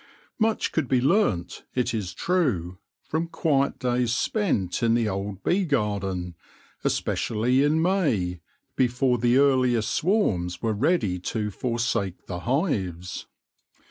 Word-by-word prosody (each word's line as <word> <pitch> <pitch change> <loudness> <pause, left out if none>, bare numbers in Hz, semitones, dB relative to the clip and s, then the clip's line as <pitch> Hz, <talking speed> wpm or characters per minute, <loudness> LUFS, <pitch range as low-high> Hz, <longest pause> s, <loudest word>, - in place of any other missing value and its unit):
Much 220 0 +1
could 160 -5 0
be 130 -1 +2
learnt, 135 - +1
it 125 -2 0
is 100 -6 -3
true, 105 - 0 0.2
from 160 +2 -2
quiet 140 -5 +1
days 125 -1 0
cpfmt 130 - 0
in 115 -1 +3
thft 115 -3 +1
old 100 0 -5
bee 195 +3 +2
garden, 100 - -1 0.5
especially 125 +5 +1
in 150 +2 +2
May, 145 - +1 0.3
before 125 0 +2
the 120 +2 +3
earliest 130 -5 +3
swarms 95 - +1
were 110 +2 0
ready 105 - +1
to 105 +3 -3
forsake 115 - -2
the 90 -2 -5
hives. 95 - -2
120 Hz, 125 wpm, -25 LUFS, 95-145 Hz, 0.5 s, in